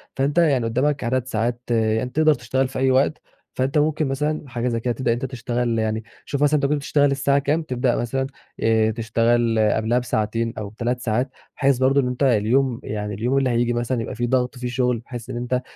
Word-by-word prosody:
فأنت 140 Hz, +4 st, 0 dB
يعني 140 Hz, -8 st, +3 dB
قدَّامك 135 Hz, +5 st, 0 dB
عدد 125 Hz, +1 st, 0 dB
ساعات 120 Hz, 0 st, -1 dB
يعني 110 Hz, +1 st, +1 dB
تقدر 155 Hz, +3 st, +3 dB
تشتغل 135 Hz, -2 st, -1 dB
في 130 Hz, -, -5 dB
أي 130 Hz, 0 st, +3 dB
وقت، 135 Hz, +4 st, +2 dB, 0.3 s
فأنت 135 Hz, +4 st, 0 dB
ممكن 155 Hz, 0 st, +1 dB
مثلًا 150 Hz, +1 st, -2 dB
حاجة 120 Hz, 0 st, -2 dB
زي 115 Hz, -2 st, 0 dB
كده 120 Hz, +1 st, -1 dB
تبدأ 130 Hz, -1 st, -1 dB
إن -, -, +4 dB
أنت -, -, -1 dB
تشتغل 120 Hz, -2 st, -1 dB
يعني 110 Hz, 0 st, -1 dB, 0.2 s
شوف 140 Hz, 0 st, -1 dB
مثلًا 145 Hz, +1 st, +4 dB
أنت 140 Hz, -, 0 dB
كنت 145 Hz, +2 st, +2 dB
بتشتغل 145 Hz, 0 st, +2 dB
الساعة 140 Hz, +1 st, +2 dB
كام 145 Hz, +4 st, 0 dB
تبدأ 125 Hz, -3 st, 0 dB
مثلًا 130 Hz, +3 st, -1 dB, 0.3 s
آآ، 110 Hz, -1 st, +3 dB
تشتغل 115 Hz, 0 st, +1 dB
قبلها 110 Hz, +3 st, +2 dB
بساعتين 115 Hz, -1 st, -1 dB
أو 105 Hz, -2 st, -4 dB
ب3 120 Hz, +3 st, -2 dB
ساعات، 120 Hz, +3 st, -1 dB, 0.3 s
بحيث 140 Hz, -2 st, +3 dB
برضه 135 Hz, +2 st, +3 dB
إن 125 Hz, -, -1 dB
أنت 125 Hz, +2 st, -2 dB
اليوم 125 Hz, +1 st, +2 dB
يعني 105 Hz, -1 st, -4 dB
اليوم 120 Hz, +7 st, 0 dB
اللي 135 Hz, -2 st, +2 dB
هييجي 120 Hz, 0 st, +1 dB
مثلًا 120 Hz, 0 st, -1 dB
يبقى -, -, -5 dB
فيه 120 Hz, +2 st, -1 dB
ضغط 125 Hz, 0 st, 0 dB
فيه 125 Hz, 0 st, -4 dB
شغل 125 Hz, -1 st, 0 dB
بحيث 120 Hz, 0 st, -9 dB
إن 120 Hz, -, -4 dB
أنت 125 Hz, +1 st, -1 dB
125 Hz, 215 wpm, -22 LUFS, 115-135 Hz, 0.3 s, إن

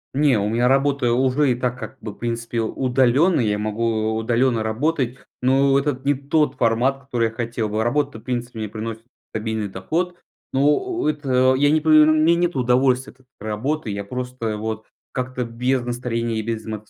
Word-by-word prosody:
Не, 140 Hz, -5 st, +3 dB
у 100 Hz, -, 0 dB
меня 120 Hz, +3 st, +1 dB
работа 135 Hz, -2 st, +2 dB
уже 130 Hz, +3 st, +2 dB
и 120 Hz, -, +1 dB
так 125 Hz, 0 st, -2 dB
как -, -, -8 dB
бы, 110 Hz, -1 st, -6 dB
в -, -, -15 dB
принципе, 115 Hz, 0 st, -3 dB
удалённая. 130 Hz, +5 st, +2 dB
Я 105 Hz, -1 st, +1 dB
могу 110 Hz, +1 st, -1 dB
у 110 Hz, -, -1 dB
удалённо 115 Hz, +1 st, +1 dB
работать, 125 Hz, +3 st, -1 dB, 0.2 s
но 135 Hz, +2 st, +3 dB
это 140 Hz, -2 st, -1 dB
не 145 Hz, -, +4 dB
тот 145 Hz, +1 st, 0 dB
формат, 125 Hz, +3 st, +1 dB
который 125 Hz, -3 st, -1 dB
я -, -, -12 dB
хотел 115 Hz, -1 st, -3 dB
бы. 110 Hz, +1 st, -1 dB
Работа, 140 Hz, 0 st, 0 dB
в -, -, -17 dB
принципе, 120 Hz, -2 st, -4 dB
мне 110 Hz, -, -3 dB
приносит 110 Hz, +1 st, -6 dB, 0.3 s
стабильный 110 Hz, -1 st, -3 dB
доход, 165 Hz, -, -2 dB, 0.4 s
но, 135 Hz, -, +1 dB
о 355 Hz, -, 0 dB
о -, -, +3 dB
это, 130 Hz, -3 st, +2 dB
я 145 Hz, +2 st, +3 dB
не 155 Hz, 0 st, +3 dB
па 160 Hz, -, -1 dB
эр 155 Hz, 0 st, +8 dB
мне 155 Hz, +2 st, +4 dB
нету 175 Hz, -5 st, 0 dB
удовольствия 125 Hz, +1 st, +2 dB
от 130 Hz, -, -26 dB
этой 130 Hz, -, -31 dB
работы. 110 Hz, +6 st, -3 dB
Я 100 Hz, 0 st, -3 dB
просто 125 Hz, 0 st, -4 dB
вот 110 Hz, 0 st, -4 dB, 0.3 s
как-то 125 Hz, -1 st, -3 dB
без 125 Hz, +3 st, 0 dB
настроения 120 Hz, -2 st, -2 dB
и -, -, -3 dB
без 115 Hz, -1 st, -3 dB
мац 110 Hz, -1 st, -7 dB
125 Hz, 200 wpm, -22 LUFS, 110-135 Hz, 0.4 s, эр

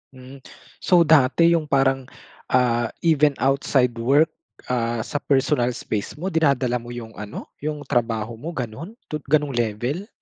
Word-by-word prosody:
Hmm. 130 Hz, +1 st, -12 dB, 0.4 s
So, 175 Hz, -2 st, +4 dB
dati 160 Hz, +2 st, +4 dB
yung 165 Hz, -3 st, +1 dB
parang, 135 Hz, -2 st, +1 dB, 0.4 s
ah, 120 Hz, -2 st, +2 dB, 0.2 s
even 150 Hz, -3 st, +3 dB
outside 135 Hz, -2 st, +2 dB
work, 140 Hz, +7 st, +3 dB, 0.4 s
ah, 115 Hz, -2 st, -1 dB
sa 145 Hz, -, -3 dB
personal 135 Hz, -3 st, +1 dB
space 105 Hz, -3 st, -4 dB
mo 185 Hz, +5 st, -4 dB
dinadala 135 Hz, -6 st, +1 dB
mo 120 Hz, +1 st, -10 dB
yung 115 Hz, -2 st, -8 dB
ano, 105 Hz, 0 st, -8 dB
yung 150 Hz, 0 st, -4 dB
trabaho 115 Hz, -4 st, -1 dB
mo 165 Hz, +6 st, -6 dB
ganun 135 Hz, -, -6 dB, 0.2 s
to 150 Hz, -, -2 dB
ganong 150 Hz, 0 st, +2 dB
level? 120 Hz, -, -2 dB
135 Hz, 145 wpm, -22 LUFS, 120-150 Hz, 0.4 s, So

